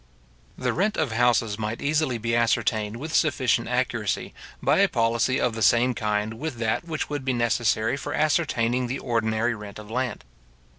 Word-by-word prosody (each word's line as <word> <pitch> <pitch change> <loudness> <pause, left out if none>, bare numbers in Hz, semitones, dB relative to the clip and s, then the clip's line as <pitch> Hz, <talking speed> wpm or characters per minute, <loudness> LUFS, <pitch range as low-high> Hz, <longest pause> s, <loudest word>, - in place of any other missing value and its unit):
The - - -1
rent 210 +5 0
of - - 0
houses 115 -2 +2
might 110 +1 -3
easily 145 -4 0
be 115 +1 -1
ascertained 115 -2 +1
with 155 +5 -6
sufficient 130 -7 +2
accuracy, 125 -4 -1 0.3
by - - +2
a - - +5
policy 115 +3 +1
of 125 - +1
the 110 - -5
same 120 +3 +4
kind 105 0 -2
with 155 -2 -4
that 115 +5 -1
which 155 -2 -3
would 145 -2 -4
be 130 -1 0
necessary 120 -1 +1
for - - -5
ascertaining 125 -6 +1
the 130 +3 -3
ordinary 115 -1 0
rent 105 -2 -9
of 105 0 -10
land. 125 +1 -2
120 Hz, 170 wpm, -25 LUFS, 110-130 Hz, 0.3 s, a